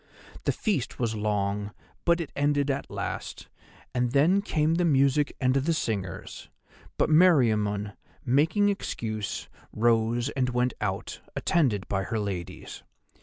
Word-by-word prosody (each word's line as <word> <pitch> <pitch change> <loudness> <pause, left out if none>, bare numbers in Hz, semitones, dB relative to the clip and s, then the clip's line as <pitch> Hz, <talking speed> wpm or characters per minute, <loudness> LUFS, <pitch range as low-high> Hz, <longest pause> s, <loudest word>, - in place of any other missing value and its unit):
"The - - +3
feast 195 - -2
was 115 -3 -1
long, 105 -1 -1 0.3
but 170 0 +4
it 165 - -4
ended 145 0 +1
at 135 +1 -4
last, - - -5 0.4
and 125 0 0
then 165 +8 +4
came 155 -5 +1
the 175 +2 +1
music 140 -2 +3
and 130 0 +2
the 140 +5 +1
singers, 100 - -4 0.5
but - - +3
Meriamun, 110 - +4 0.3
making 160 - +3
excuse, 110 - -3 0.2
rose 115 +2 +2
and 130 -3 0
went 125 0 0
out, - - -3
attended 120 - +1
by 95 -1 -1
her 115 - -2
ladies. 100 -5 -5
125 Hz, 130 wpm, -27 LUFS, 105-150 Hz, 0.5 s, but